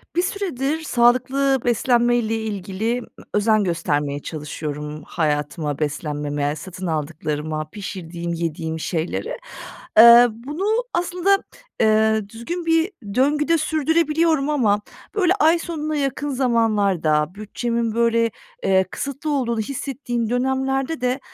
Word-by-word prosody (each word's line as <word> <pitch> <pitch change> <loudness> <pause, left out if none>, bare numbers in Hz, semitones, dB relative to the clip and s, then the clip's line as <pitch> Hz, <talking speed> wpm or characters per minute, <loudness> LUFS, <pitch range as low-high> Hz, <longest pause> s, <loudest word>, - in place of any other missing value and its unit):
Bir 350 - +3
süredir 320 -7 -2
sağlıklı 260 +1 +2
beslenmeyle 240 -1 +2
ilgili, 215 +1 -2
ımm, 245 - -11 0.3
özen 215 0 +3
göstermeye 150 -5 -1
çalışıyorum 150 0 -5
hayatıma, 150 -2 -2
beslenmeme, 145 -1 -2
satın 185 +3 -7
aldıklarıma, 155 -1 -3
pişirdiğim, 170 -3 -6
yediğim 160 -1 -3
şeylere. 175 - -3 0.6
Iıı, 235 +1 +10
bunu 290 - -5 0.3
aslında, 360 +3 +1 0.4
ııı, 220 -1 +3
düzgün 285 - -5
bir 330 +3 +2 0.2
döngüde 300 +5 +3
sürdürebiliyorum 315 -1 +1
ama 215 -9 +2 0.3
böyle 370 -4 +3
ay 335 -3 +4
sonuna 310 -3 -3
yakın 290 0 -1
zamanlarda, 205 - +1
bütçemin 230 +2 -2
böyle, 230 -1 +2 0.3
eee, 190 0 +4
kısıtlı 280 +2 -4
olduğunu 240 -5 0
hissettiğim 245 -1 -3
dönemlerde 265 +3 0
de 250 +1 0
230 Hz, 105 wpm, -22 LUFS, 170-280 Hz, 0.6 s, Iıı